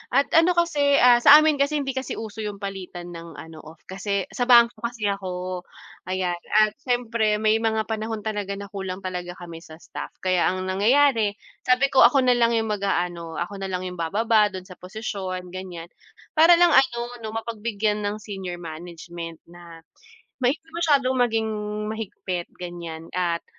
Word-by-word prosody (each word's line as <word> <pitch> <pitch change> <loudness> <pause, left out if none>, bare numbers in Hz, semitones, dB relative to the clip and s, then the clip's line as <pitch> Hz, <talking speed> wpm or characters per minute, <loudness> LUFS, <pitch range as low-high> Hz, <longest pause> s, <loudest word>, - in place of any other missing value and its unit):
at 280 - +3
ano 335 +2 +4
kasi, 340 -3 +1 0.2
ah, 245 -2 +6
sa 280 +4 +9
amin 305 -3 +2
kasi 280 +2 +1
hindi 280 -2 -1
kasi 260 0 -4
uso 220 -1 -7
yung 210 -1 -4
palitan 190 -3 -7
ng 170 -1 -10
ano 160 -1 -10
off 155 +1 -14
kasi 195 +1 -3
sa 245 - -2
bangko 235 -1 +6
kasi 235 -4 -2
ako, 185 -2 -4 0.5
ayan 185 -2 -2 0.2
at 215 - +1
siyempre 235 -4 0
may 215 +1 +2
mga 220 -1 0
panahon 220 -1 -4
talaga 205 -2 -3
na 200 +2 -9
kulang 190 -1 -5
talaga 180 -1 -5
kami 170 -2 -9
sa 160 -2 -13
staff, 165 - -9
kaya 185 -2 +2
ang 185 0 -1
nangyayari 225 0 +3 0.3
sabi 255 +2 +3
ko 265 - +3
ako 265 +1 +2
nalang 240 -2 +3
yung 225 -1 0
mag-aano, 175 -5 -2
ako 195 +4 -4
nalang 185 -1 -3
yung 180 - -10
bababa 210 +5 +2
do'n 190 -2 -7
sa 185 -1 -14
posisyon 185 -2 -5
ganiyan 180 -2 -8 0.4
para 330 +2 +7
lang 345 -1 +5
ano 265 -3 +4 0.2
'no, 220 -1 -7
mapagbigyan 220 -2 -2
ng 210 +1 -5
senior 190 -4 -6
management 170 0 -9
na 170 -1 -13 0.6
may 255 +4 +2 0.2
masyadong 290 -6 +2
maging 230 -3 +1 0.5
mahigpit 185 -5 -5
ganiyan 170 -2 -7
at 175 -2 -1
205 Hz, 165 wpm, -24 LUFS, 180-235 Hz, 0.6 s, sa